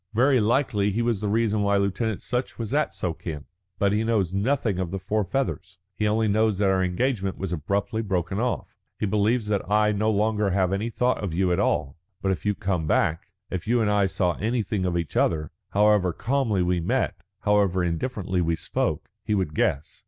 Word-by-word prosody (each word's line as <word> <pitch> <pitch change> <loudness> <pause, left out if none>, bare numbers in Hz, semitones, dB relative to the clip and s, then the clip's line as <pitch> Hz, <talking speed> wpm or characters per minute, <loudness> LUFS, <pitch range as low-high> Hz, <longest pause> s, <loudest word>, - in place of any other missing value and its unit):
Very 130 +3 +4
likely 110 -2 +2
he 110 +4 0
was 115 -4 0
the 105 - -1
reason 110 0 +1
why 100 0 +2
Lieutenant 100 +2 -1
Sutch 125 0 -2
was 115 +1 -4
at 150 +1 +1
Suakin, 80 -3 -4 0.3
but 100 -1 +2
he 105 +1 +1
knows 105 -6 +1
nothing 105 -1 0
of 90 -2 -1
the 95 - -3
four 105 +3 -1
feathers. 95 -4 -3 0.2
He 105 +3 0
only 110 +1 +2
knows 110 0 +2
that 100 -1 +3
our 95 -1 +2
engagement 95 +1 -1
was 95 -2 -3
abruptly 100 +7 -1
broken 95 -2 -1
off; 125 +1 -2 0.2
he - - -1
believes 105 +3 +1
that 100 -2 +1
I 105 +1 +4
have 105 - -1
no 110 +2 +2
longer 105 -1 +1
any 95 +3 0
thought 125 0 0
of 90 -5 -3
you 90 0 +2
at 90 - +1
all. 70 +4 0 0.2
But 95 - 0
if 95 - -3
you 105 - +2
come 90 -5 -1
back, 85 +2 +1 0.2
if 90 0 -4
you 120 +2 +3
and 105 -2 +2
I 100 -1 +3
saw 90 -2 0
anything 105 -3 -1
of 85 -1 0
each 85 -3 -4
other, 75 -2 +1 0.2
however 105 -3 +3
calmly 115 -6 0
we 90 0 +1
met, 85 - 0 0.2
however 100 -3 +2
indifferently 95 +1 -1
we 85 -1 +1
spoke, - - -2 0.2
he 105 - 0
would 90 -6 -1
guess. 70 0 -1
100 Hz, 205 wpm, -25 LUFS, 90-110 Hz, 0.3 s, Very